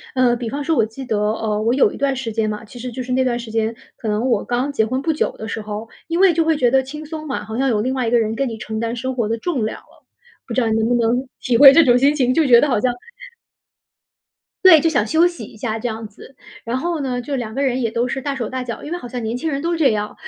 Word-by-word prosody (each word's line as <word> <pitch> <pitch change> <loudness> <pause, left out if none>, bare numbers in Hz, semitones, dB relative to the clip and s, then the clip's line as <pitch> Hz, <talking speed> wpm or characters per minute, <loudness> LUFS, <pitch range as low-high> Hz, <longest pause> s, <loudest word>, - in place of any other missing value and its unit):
呃， 250 -2 +3
比 235 -1 -4
方 285 +5 -4
说 325 +1 +1
我 220 - +4
记 225 +5 -8
得， 220 -4 -1
呃， 210 0 -1
我 230 - +2
有 275 - +3
一 - - -8
段 275 0 0
时 240 -3 -4
间 215 -1 0
嘛， 210 +1 -6
其 240 +3 -12
实 250 +1 -5
就 255 +2 -5
是 250 +1 -5
那 260 +1 +2
段 240 -2 0
时 235 -2 -8
间， 225 0 -1 0.2
可 225 - -6
能 215 +5 0
我 240 - +1
刚 250 +4 -1
结 220 -6 +2
婚 255 +4 -2
不 320 +1 +1
久 305 - -1
的 220 - -7
时 220 +1 -4
候， 210 +1 -6 0.2
因 335 +1 -1
为 385 -2 +6
就 330 - +2
会 320 -1 +2
觉 245 -4 +2
得 265 0 +3
轻 300 +4 -8
松 310 0 -7
嘛， 275 - -4
好 220 +1 -6
像 270 +1 +1
有 215 -4 +1
另 255 +4 -1
外 250 -3 -1
一 - - 0
个 240 - +4
人 220 0 0
跟 270 +3 -1
你 225 -2 -6
承 220 +1 -5
担 230 +1 -2
生 260 +2 -3
活 230 -4 -1
的 230 - -1
重 265 -4 -2
量 220 - -4
了。 - - -25 0.4
不 235 - -4
知 255 - +1
道 235 - +1
你 220 - +1
能 220 - +1
不 245 - +2
能 240 +3 0
体 245 -3 +1
会 275 +1 +10
这 330 +2 +6
种 245 -2 +5
心 275 +3 +4
情， 255 -3 +1
就 325 - +3
觉 240 -4 +7
得 - - +2
好 230 -5 +1
像 250 +1 +1 1.7
对， 360 -4 +9
就 330 - +2
想 235 -8 +1
休 320 +7 +4
息 340 -10 -4
一 215 - -13
下 225 0 -3
这 240 - -3
样 220 -1 -5
子。 210 +5 -15 0.3
然 235 +2 -2
后 335 +4 -2
呢， 255 -3 -2
就 280 +3 -4
2 220 -3 -5
个 275 - -1
人 260 -1 0
也 230 -2 0
都 235 +2 0
是 270 - -3
大 280 0 -3
手 235 -4 -3
大 260 -1 -3
脚， 235 -2 -6
因 305 - -7
为 350 - -2
好 245 - -9
像 245 0 -5
年 225 +2 -2
轻 315 +5 -2
人 275 0 -3
都 340 - -1
是 335 - -1
这 280 -6 +4
样。 210 0 -3
245 Hz, 335 characters per minute, -20 LUFS, 225-275 Hz, 1.7 s, 会